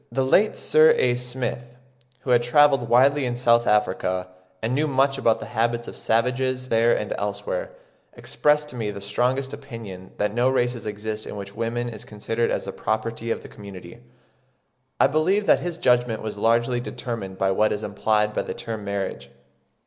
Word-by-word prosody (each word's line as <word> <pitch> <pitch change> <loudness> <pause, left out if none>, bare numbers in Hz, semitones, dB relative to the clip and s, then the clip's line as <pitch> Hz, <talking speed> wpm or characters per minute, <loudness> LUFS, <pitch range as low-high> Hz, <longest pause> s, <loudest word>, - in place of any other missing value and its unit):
The 135 -1 0
late 205 +11 +3
Sir 155 +1 +5
A. 125 - +3
Smith, 125 0 -4 0.4
who 130 - -2
had 120 -1 +5
travelled 135 -1 +4
widely 135 +4 +4
in 125 -1 -1
S. 120 +1 -7
Africa, 105 -5 +2 0.3
and 115 +5 -2
knew 150 +4 +1
much 135 0 +2
about 115 -4 +2
the - - -6
habits 120 +1 0
of - - -8
savages 130 +3 0
there 115 +1 +3
and - - -3
elsewhere, - - -3 0.4
expressed 150 0 +1
to - - -9
me 110 -3 -2
the 100 - -6
strongest 125 +7 -1
opinion 115 -10 -9
that 105 0 0
no 120 +3 +2
race 120 -3 0
exists 105 +1 -5
in - - -6
which 100 -1 -7
woman 120 +1 -2
is 115 - -7
considered 115 +2 -2
as - - -2
the - - -4
property 115 +2 -3
of - - -2
the - - -9
community. 100 0 -11 1.0
I - - +6
believe 185 +7 +2
that - - +5
his 175 -1 -4
judgment 120 -5 +2
was 110 - -4
largely 115 +3 +2
determined 115 -6 -5
by 95 0 +1
what 105 +3 +2
is 105 - -3
implied 105 -1 0
by - - 0
the - - -6
term 110 -2 -6
marriage. 100 -1 -4
120 Hz, 180 wpm, -24 LUFS, 110-130 Hz, 1.0 s, I